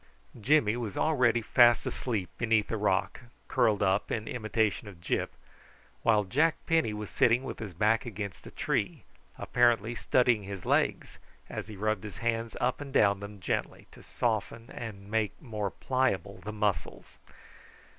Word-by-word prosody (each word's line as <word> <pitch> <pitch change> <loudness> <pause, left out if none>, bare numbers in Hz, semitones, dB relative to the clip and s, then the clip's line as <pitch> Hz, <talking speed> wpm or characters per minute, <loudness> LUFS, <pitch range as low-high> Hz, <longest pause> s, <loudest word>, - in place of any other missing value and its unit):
Jimmy 115 -2 +3
was 115 -5 -4
already 125 -7 +2
fast 120 +1 +5
asleep 105 -8 -3
beneath 110 -2 +2
a - - 0
rock, 100 -3 0 0.3
curled 105 -3 +2
up 95 +2 +1
in 110 -1 -2
imitation 110 -2 -1
of 95 -5 -11
Gyp, 85 - -1 0.7
while 105 -2 +3
Jack 150 - +2
Penny 160 -9 +2
was 105 -1 -6
sitting 120 +2 +3
with 135 - -6
his 105 -6 -7
back 110 +5 +2
against 100 -5 -6
a - - -7
tree, - - -2 0.3
apparently 120 -1 +2
studying 120 -2 +2
his 100 -2 -7
legs - - 0 0.3
as - - -5
he 110 - -8
rubbed 110 0 -1
his 105 -2 -8
hands 115 +1 -2
up 125 +3 0
and 140 -1 -7
down 100 -6 +4
them 100 0 -9
gently, 90 - -3
to - - -15
soften 115 +1 -2
and 100 -3 -8
make 110 -2 0
more 105 -6 -3
pliable 100 -6 -1
the 105 - -6
muscles. 105 -2 -3
110 Hz, 155 wpm, -29 LUFS, 100-120 Hz, 0.7 s, fast